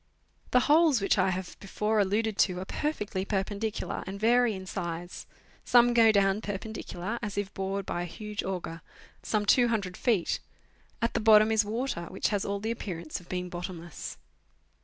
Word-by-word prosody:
The 250 - +4
holes 300 -2 +5
which 195 - +2
I - - +3
have 185 0 -4
before 210 +2 -1
alluded 210 +2 +1
to 180 -2 +3
are 185 - -5
perfectly 210 -8 -2
per 195 -1 0
pendicular, 210 +2 -4
and 195 +1 -5
vary 235 0 +3
in 190 0 -7
size. 175 -2 -5 0.4
Some 240 0 +5
go 225 -2 +6
down 200 0 +2
perpendicular, 210 0 -5
as 210 -3 -4
if 205 0 -2
bored 195 0 -3
by 175 - -2
a - - -2
huge 210 +4 -5
auger, 175 -3 -4 0.4
some 210 -1 0
200 220 -5 +2
feet; 220 -9 +1 0.6
at 230 - +1
the - - +1
bottom 215 0 +6
is 220 -1 +4
water, 220 -4 -3
which 190 - -1
has 205 -2 0
all 200 0 -2
the 220 +3 -2
appearance 175 -8 -5
of 175 - -18
being 180 0 -3
bottomless. 175 -2 -7
205 Hz, 175 wpm, -29 LUFS, 185-220 Hz, 0.6 s, go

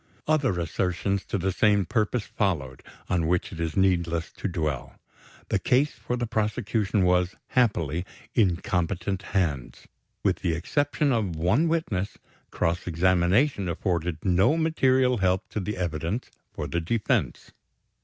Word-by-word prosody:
Other 140 - +2
assertions 90 +3 -1
to - - -2
the 95 +1 0
same 100 0 +3
purpose 110 +4 0
followed, 75 -11 -2 0.3
on 85 -3 +1
which 90 +1 0
it 85 - -8
is 80 0 -2
needless 85 -3 +1
to - - -4
dwell. 75 -8 -3 0.5
The - - +1
case 140 +4 +2
for 125 - -4
the 120 - -1
prosecution 110 -2 0
was, 90 +1 +2
happily, 90 - +1 0.3
in 100 -7 +3
competent 90 +2 -1
hands. 85 -11 -2 0.4
With - - +2
the 85 - -1
exception 145 - 0
of 105 -8 0
one 95 - +2
witness, 160 - -1 0.3
cross 85 +2 -1
examination 90 - +2
afforded 85 +1 -2
no 95 - +4
material 130 -6 +3
help 95 0 +1
to - - -3
the 105 +2 -3
evidence 85 +6 -3 0.2
for - - -5
the 85 - -2
defense. 105 +6 -1
95 Hz, 140 wpm, -26 LUFS, 85-110 Hz, 0.5 s, no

